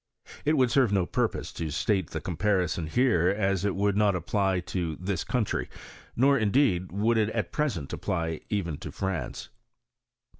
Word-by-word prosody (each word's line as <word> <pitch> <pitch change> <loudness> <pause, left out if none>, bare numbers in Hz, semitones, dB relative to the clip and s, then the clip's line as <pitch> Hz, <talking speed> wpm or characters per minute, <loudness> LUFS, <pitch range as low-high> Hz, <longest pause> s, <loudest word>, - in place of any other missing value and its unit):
It 155 +1 +3
would 130 -2 +3
serve 130 -5 +3
no 95 -3 +2
purpose - - -2
to 80 -2 -4
state 95 +4 0
the 80 - -4
comparison 90 -1 0
here, 90 -3 +3
as 95 -2 0
it 100 - 0
would 100 0 +1
not 105 -2 +3
apply 95 +2 0
to 85 -3 -3
this 90 +1 -3
country; 120 -5 -1 0.5
nor, 140 +2 +4
indeed, 105 -5 +2
would 110 +4 +2
it 105 -1 +2
at 110 -5 -2
present 110 - -2
apply 80 -3 -2
even 90 -8 -2
to - - -7
France. 95 -3 -4
95 Hz, 160 wpm, -27 LUFS, 85-110 Hz, 0.5 s, nor